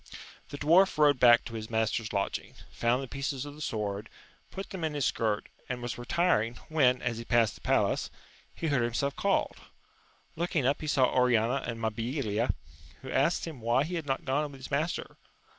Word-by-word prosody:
The 145 Hz, -, -6 dB
dwarf 170 Hz, +6 st, +4 dB
rode 145 Hz, -3 st, +5 dB
back 120 Hz, -1 st, +6 dB
to 115 Hz, -, -7 dB
his 110 Hz, -1 st, -5 dB
master's 110 Hz, -1 st, 0 dB
lodging, 100 Hz, -, -2 dB, 0.2 s
found 120 Hz, +3 st, +1 dB
the -, -, -6 dB
pieces 135 Hz, +1 st, -3 dB
of 145 Hz, -, -8 dB
the 150 Hz, -, -12 dB
sword, 105 Hz, -4 st, -3 dB, 0.4 s
put 195 Hz, +1 st, -7 dB
them 190 Hz, -4 st, -5 dB
in 155 Hz, -2 st, -1 dB
his 140 Hz, -3 st, 0 dB
skirt, 110 Hz, -2 st, 0 dB, 0.2 s
and 125 Hz, -1 st, -2 dB
was 120 Hz, 0 st, -5 dB
retiring, 120 Hz, -4 st, +1 dB
when, 130 Hz, -5 st, +3 dB
as 120 Hz, -2 st, -1 dB
he -, -, -5 dB
passed 115 Hz, -3 st, +3 dB
the -, -, -15 dB
palace, -, -, +1 dB, 0.5 s
he -, -, -5 dB
heard 140 Hz, -4 st, +2 dB
himself 120 Hz, +4 st, -1 dB
called. 200 Hz, -1 st, 0 dB, 0.8 s
Looking 165 Hz, -4 st, 0 dB
up, 140 Hz, +3 st, +1 dB
he 155 Hz, -, -4 dB
saw 135 Hz, -3 st, +4 dB
Oriana 125 Hz, 0 st, +3 dB
and 115 Hz, -1 st, -4 dB
Ma 110 Hz, -1 st, 0 dB
bilia, 115 Hz, -1 st, -1 dB, 0.5 s
who 130 Hz, -, -6 dB
asked 145 Hz, +6 st, +2 dB
him 155 Hz, -7 st, -8 dB
why 120 Hz, +4 st, +2 dB
he 170 Hz, +4 st, -5 dB
had 165 Hz, -4 st, -3 dB
not 135 Hz, -, -2 dB
gone 145 Hz, +2 st, 0 dB
with 135 Hz, -, -11 dB
his 130 Hz, -, -9 dB
master. 155 Hz, +5 st, -2 dB
130 Hz, 195 wpm, -29 LUFS, 115-150 Hz, 0.8 s, back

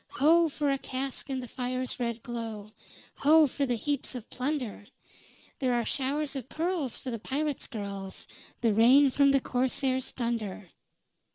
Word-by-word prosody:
"Ho! 325 Hz, +4 st, +5 dB
for 290 Hz, -1 st, 0 dB
a 275 Hz, -, 0 dB
cask 265 Hz, +1 st, -4 dB
in 265 Hz, -1 st, -2 dB
the 250 Hz, -, -7 dB
fire's 255 Hz, +1 st, -3 dB
red 235 Hz, -2 st, -2 dB
glow; 225 Hz, -3 st, -6 dB, 0.5 s
Ho! 310 Hz, +2 st, +6 dB
for 280 Hz, 0 st, -1 dB
the 245 Hz, -, +1 dB
heaps 280 Hz, +3 st, -1 dB
of 245 Hz, -2 st, -8 dB
plunder. 255 Hz, -6 st, -3 dB, 0.7 s
There 255 Hz, -2 st, +1 dB
are 235 Hz, -1 st, 0 dB
showers 285 Hz, +1 st, -1 dB
of 265 Hz, -2 st, -5 dB
pearls 325 Hz, -6 st, -1 dB
for 255 Hz, -, -6 dB
the 230 Hz, -, -4 dB
pirates' 290 Hz, +5 st, -2 dB
girls 200 Hz, -4 st, -6 dB, 0.4 s
The 230 Hz, -3 st, +3 dB
rain 260 Hz, +6 st, +6 dB
from 280 Hz, +1 st, +4 dB
the 275 Hz, 0 st, +4 dB
corsair's 260 Hz, +1 st, 0 dB
thunder!" 225 Hz, -6 st, -3 dB
255 Hz, 160 wpm, -29 LUFS, 235-280 Hz, 0.7 s, Ho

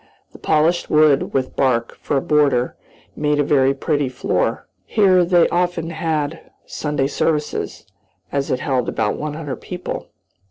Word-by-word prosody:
The -, -, -14 dB
polished 160 Hz, +3 st, +1 dB
wood, 150 Hz, -2 st, +4 dB
with 130 Hz, -1 st, -2 dB
bark 125 Hz, -4 st, +1 dB
for 145 Hz, -, 0 dB
a -, -, +1 dB
border, 140 Hz, -5 st, +2 dB, 0.4 s
made 150 Hz, 0 st, 0 dB
a -, -, +4 dB
very 135 Hz, -1 st, +3 dB
pretty 145 Hz, -1 st, 0 dB
floor. 125 Hz, -, -1 dB, 0.2 s
Here 190 Hz, -4 st, +4 dB
they 175 Hz, -1 st, +4 dB
often 175 Hz, -2 st, -1 dB
had 160 Hz, -1 st, -2 dB, 0.3 s
Sunday 150 Hz, -3 st, -2 dB
services, 150 Hz, +1 st, -2 dB, 0.5 s
as 140 Hz, -1 st, -1 dB
it 125 Hz, -, -1 dB
held 130 Hz, -3 st, 0 dB
about 105 Hz, -2 st, -1 dB
one 150 Hz, -1 st, -4 dB
hundred 150 Hz, -4 st, -5 dB
people. 180 Hz, -1 st, -6 dB
150 Hz, 150 wpm, -20 LUFS, 135-165 Hz, 0.5 s, wood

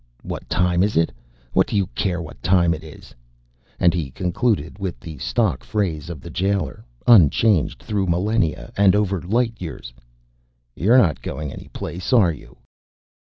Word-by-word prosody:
"What -, -, -7 dB
time 90 Hz, 0 st, +2 dB
is 100 Hz, -3 st, +1 dB
it? 80 Hz, 0 st, +2 dB, 0.4 s
What -, -, +3 dB
do -, -, -3 dB
you 100 Hz, -2 st, +2 dB
care 90 Hz, -3 st, -1 dB
what 80 Hz, -, -11 dB
time 85 Hz, -1 st, +3 dB
it 80 Hz, -1 st, -7 dB
is?" 80 Hz, -2 st, -13 dB, 0.7 s
And 85 Hz, -, +4 dB
he 80 Hz, -6 st, -2 dB
concluded 90 Hz, -, -1 dB
with 95 Hz, -10 st, -4 dB
the 75 Hz, +2 st, -9 dB
stock -, -, 0 dB
phrase 85 Hz, -7 st, -2 dB
of 80 Hz, -6 st, -7 dB
the -, -, -9 dB
jailer, 100 Hz, +1 st, -1 dB, 0.2 s
unchanged 105 Hz, -, +4 dB
through 100 Hz, -3 st, -1 dB
millenia 90 Hz, -, 0 dB
and 100 Hz, -1 st, +5 dB
over 100 Hz, -4 st, 0 dB
light 115 Hz, +5 st, 0 dB
years. 80 Hz, -8 st, -7 dB, 0.8 s
"You're 115 Hz, +8 st, +4 dB
not 80 Hz, -, +3 dB
going 75 Hz, +1 st, -5 dB
any -, -, -10 dB
place, 90 Hz, +6 st, -6 dB
are 100 Hz, -9 st, +5 dB
you?" 75 Hz, -, -14 dB
90 Hz, 160 wpm, -22 LUFS, 80-100 Hz, 0.8 s, and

